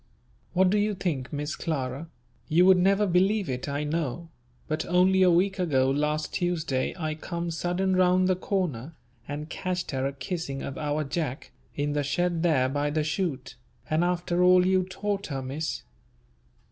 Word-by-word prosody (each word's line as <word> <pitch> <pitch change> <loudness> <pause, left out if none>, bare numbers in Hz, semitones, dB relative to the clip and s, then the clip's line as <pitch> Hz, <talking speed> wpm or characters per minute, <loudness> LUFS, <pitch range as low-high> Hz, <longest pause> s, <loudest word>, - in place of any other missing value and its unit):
What 185 0 +4
do 210 - +3
you 210 0 +1
think, 155 -9 -3
Miss 150 +1 -3
Clara, 140 -2 -3 0.4
you 170 +3 +4
would 190 -1 +6
never 195 +3 +3
believe 195 +2 +2
it 125 +1 -3
I 145 +1 -2
know, 160 +1 -3 0.4
but 155 +1 -1
only 185 +2 +4
a 185 - +6
week 190 +3 +2
ago 135 -7 +2
last 150 +2 -1
Tuesday 160 -7 -1
I 155 -3 -2
come 170 +2 -4
sudden 180 +3 0
round 185 0 +4
the 185 - +3
corner, 170 - -2 0.3
and 150 +1 -5
catched 180 +1 -3
her 135 -1 -1
a 140 - -4
kissing 140 0 -4
of 135 - -5
our 150 0 -1
Jack 145 -2 -4 0.2
in 145 0 -1
the 145 - +1
shed 165 +4 0
there 155 -7 +3
by 145 +2 -1
the 155 +1 0
shoot. 155 -4 -2 0.4
And 155 +2 +3
after 175 0 0
all 180 0 +6
you 185 0 +2
taught 200 +1 -3
her, 135 -3 -4
Miss! 135 +1 -4
165 Hz, 170 wpm, -27 LUFS, 145-185 Hz, 0.4 s, would